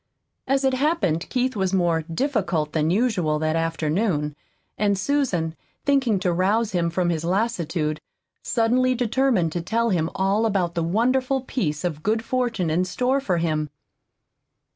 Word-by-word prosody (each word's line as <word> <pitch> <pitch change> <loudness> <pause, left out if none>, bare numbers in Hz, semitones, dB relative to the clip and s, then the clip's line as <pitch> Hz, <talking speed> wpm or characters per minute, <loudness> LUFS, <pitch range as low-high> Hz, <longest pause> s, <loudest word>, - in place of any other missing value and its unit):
As 270 +1 +1
it 265 -1 +2
happened 260 - 0
Keith 255 0 0
was 190 -2 0
more 170 -3 +2
"difficult" 170 - -1
than 155 0 +1
usual 185 -7 +1
that 155 +1 0
afternoon, 165 -1 0 0.4
and 200 -1 +1
Susan, 190 - 0 0.3
thinking 265 -8 +2
to 180 -2 +1
rouse 205 +5 +1
him 170 -2 0
from 175 +1 0
his 160 -1 -2
lassitude, 170 -5 -1 0.4
suddenly 250 +2 +2
determined 240 -7 +1
to 175 - -2
tell 230 +6 0
him 165 -3 +1
all 200 +4 +2
about 185 -5 0
the 170 - -1
wonderful 255 +9 +1
piece 175 - -2
of 160 -4 -2
good 220 +5 0
fortune 235 -10 -1
in 175 +3 +2
store 250 +9 0
for 185 -10 0
him. 155 -2 -1
190 Hz, 150 wpm, -23 LUFS, 165-245 Hz, 0.4 s, it